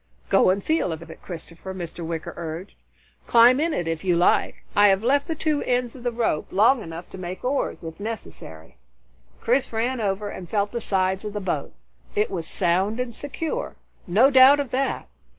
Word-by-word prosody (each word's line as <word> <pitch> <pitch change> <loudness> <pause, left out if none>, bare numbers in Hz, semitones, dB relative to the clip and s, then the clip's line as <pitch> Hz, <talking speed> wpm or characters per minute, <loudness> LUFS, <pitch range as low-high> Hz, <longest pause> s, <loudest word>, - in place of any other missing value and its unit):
"Go - - +5
and 195 +1 +1
feel 315 - +1
of 165 +1 -6
it, - - -13
Christopher," 175 +2 -8
Mr. 175 -1 -6
Wicker 165 -1 -4
urged. 170 +3 -6 0.5
"Climb 240 +3 +6
in 330 +2 +1
it 175 - -2
if 165 -1 -3
you 180 -2 +2
like. 175 +1 +2
I 205 0 +7
have 195 +1 +3
left 280 +4 +2
the 325 - -2
two 305 -1 0
ends 245 -1 -1
of 255 - -11
the 245 0 -1
rope 230 -10 -1
long 225 +6 +4
enough 165 -1 -8
to 190 - -9
make 180 0 -6
oars, 265 -6 -1
if 160 +1 -8
necessary." 80 - -8 0.6
Chris 255 +3 +1
ran 235 +2 -1
over 205 0 -1
and 180 -4 -8
felt 205 -1 0
the 235 - -3
sides 190 -1 0
of 210 -1 -5
the 210 - -2
boat. 175 -7 -3 0.4
It 210 0 +1
was 170 -4 -4
sound 190 +7 0
and 250 -1 -3
secure, 315 - -4 0.3
no 225 +10 +5
doubt 265 +2 +8
of 275 -4 -3
that. 270 +2 -1
205 Hz, 195 wpm, -24 LUFS, 175-250 Hz, 0.6 s, doubt